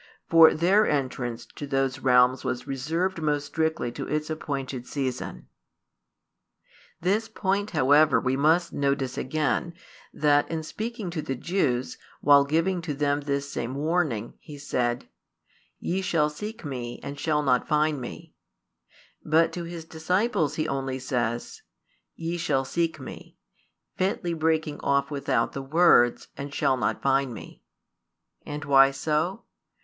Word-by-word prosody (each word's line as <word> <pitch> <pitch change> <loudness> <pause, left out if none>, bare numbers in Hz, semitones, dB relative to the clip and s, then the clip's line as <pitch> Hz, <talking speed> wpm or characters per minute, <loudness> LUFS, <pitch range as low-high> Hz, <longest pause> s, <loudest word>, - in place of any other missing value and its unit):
For 165 -1 +7
their 190 +6 +4
entrance 125 -4 -2
to 145 - -9
those 135 -1 0
realms 125 0 +4
was 125 0 -3
reserved 165 +7 -2
most 145 -1 0
strictly 160 -4 -1
to - - -6
its 155 +1 -2
appointed 135 -5 -4
season. 130 -3 -4 1.5
This 210 +6 0
point 200 -1 -1
however 145 - +4
we 130 +2 0
must 160 +5 +2
notice 140 -2 0
again, 155 +4 -1 0.4
that 145 -1 +2
in 160 -1 -3
speaking 220 +2 -5
to 165 -2 -3
the 135 - -3
Jews, 130 -5 -1 0.2
while 140 -1 +6
giving 165 +5 +1
to 160 -4 -4
them 145 0 0
this 140 -1 -2
same 120 +1 -4
warning, 145 -7 -1
He 150 -2 -11
said: 125 -4 -2 0.7
Ye 190 +2 -1
shall 155 -5 +1
seek 210 +6 -7
Me, 125 -4 -5
and 140 0 -6
shall 150 -2 +1
not 125 -3 +2
find 150 -2 +1
Me; 120 - -9 0.9
but 160 +2 +3
to 175 -1 -4
His 170 -1 -7
disciples 165 - 0
He 155 0 -1
only 135 -2 -2
says: 120 -3 -3 0.5
Ye 170 +1 -3
shall 145 -6 0
seek 165 +2 -1
Me, 130 - -10 0.6
fitly 185 -2 -1
breaking 160 -2 0
off 140 +1 +1
without 140 -1 0
the 135 - -5
words 135 -4 +4
"and 140 +1 -6
shall 135 - +1
not 125 - -2
find 135 -2 +1
Me." - - -11 0.9
And 150 0 -5
why 135 -1 +6
so? 155 +9 -1
145 Hz, 140 wpm, -26 LUFS, 135-165 Hz, 1.5 s, For